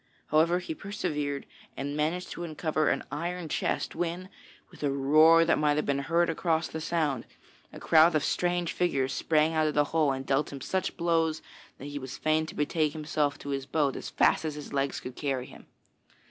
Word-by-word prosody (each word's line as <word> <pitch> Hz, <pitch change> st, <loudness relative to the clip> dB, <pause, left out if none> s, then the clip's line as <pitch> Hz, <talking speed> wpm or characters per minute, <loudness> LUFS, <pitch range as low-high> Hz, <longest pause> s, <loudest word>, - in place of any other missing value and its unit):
However, 165 Hz, +3 st, +4 dB
he 185 Hz, -, -4 dB
persevered 160 Hz, -, -3 dB, 0.3 s
and 145 Hz, +1 st, -3 dB
managed 160 Hz, +4 st, -1 dB
to 175 Hz, -, -5 dB
uncover 155 Hz, -1 st, 0 dB
an -, -, 0 dB
iron 170 Hz, +3 st, -3 dB
chest -, -, -1 dB
when, 175 Hz, +2 st, -3 dB, 0.4 s
with -, -, -15 dB
a 145 Hz, -, +1 dB
roar 155 Hz, +5 st, +5 dB
that 170 Hz, -, +2 dB
might 150 Hz, -1 st, +3 dB
have 150 Hz, -, 0 dB
been 140 Hz, 0 st, 0 dB
heard 170 Hz, +5 st, +2 dB
across 165 Hz, 0 st, 0 dB
the 160 Hz, -, -6 dB
Sound, 155 Hz, -6 st, -1 dB, 0.4 s
a -, -, -10 dB
crowd 160 Hz, +1 st, +5 dB
of 155 Hz, -, +2 dB
strange 175 Hz, -1 st, 0 dB
figures 140 Hz, -7 st, 0 dB
sprang 155 Hz, 0 st, +2 dB
out 155 Hz, -1 st, +2 dB
of 150 Hz, -, -2 dB
the 145 Hz, -, +5 dB
hole 155 Hz, -3 st, +3 dB
and 135 Hz, 0 st, -4 dB
dealt 135 Hz, +2 st, 0 dB
him 140 Hz, -, -7 dB
such 185 Hz, +7 st, -2 dB
blows 165 Hz, -2 st, +1 dB, 0.3 s
that 135 Hz, -, -9 dB
he 145 Hz, 0 st, -5 dB
was 130 Hz, -1 st, -7 dB
fain 155 Hz, 0 st, +1 dB
to -, -, -9 dB
betake 150 Hz, 0 st, 0 dB
himself 150 Hz, -2 st, -1 dB
to 145 Hz, -, -8 dB
his 135 Hz, -1 st, -3 dB
boat 145 Hz, -1 st, +1 dB
as -, -, -6 dB
fast -, -, +3 dB
as 155 Hz, -2 st, -3 dB
his 150 Hz, -1 st, -8 dB
legs 140 Hz, 0 st, -1 dB
could 125 Hz, -, -8 dB
carry 135 Hz, -4 st, -2 dB
him. -, -, -14 dB
155 Hz, 200 wpm, -28 LUFS, 145-165 Hz, 0.4 s, roar